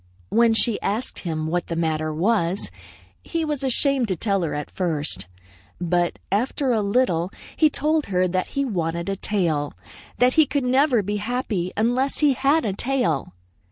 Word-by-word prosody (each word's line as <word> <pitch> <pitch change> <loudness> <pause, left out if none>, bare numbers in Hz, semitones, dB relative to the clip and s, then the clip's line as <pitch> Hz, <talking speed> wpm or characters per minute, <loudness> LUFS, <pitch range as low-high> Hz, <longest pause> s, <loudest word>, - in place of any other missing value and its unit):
When 230 0 +4
she 225 -1 +1
asked 220 +6 -2
him 160 -3 -3
what 175 +2 -1
the 165 - -3
matter 155 -1 -1
was, 180 +2 0 0.5
he 330 -1 -2
was 295 -3 -2
ashamed 270 -1 +2
to 190 - 0
tell 195 +2 0
her 165 -4 -2
at 150 - -5
first. 150 - -1 0.5
But 175 0 0
after 255 +6 0
a 225 -3 +2
little 200 -5 +1 0.3
he 310 - +4
told 305 +1 0
her 185 -1 +2
that 185 +1 -1
he 280 - +2
wanted 170 -5 -2
a 195 - -1
tail; 165 -8 -1 0.4
that 250 +1 +4
he 315 -2 +5
could 280 +1 -1
never 260 +1 +3
again 205 - +1
be 205 +1 -1
happy 205 -5 -2
unless 245 +5 +1
he 295 -3 +4
had 280 +4 +2
a 200 - 0
tail. 225 - -1
205 Hz, 175 wpm, -23 LUFS, 170-260 Hz, 0.5 s, he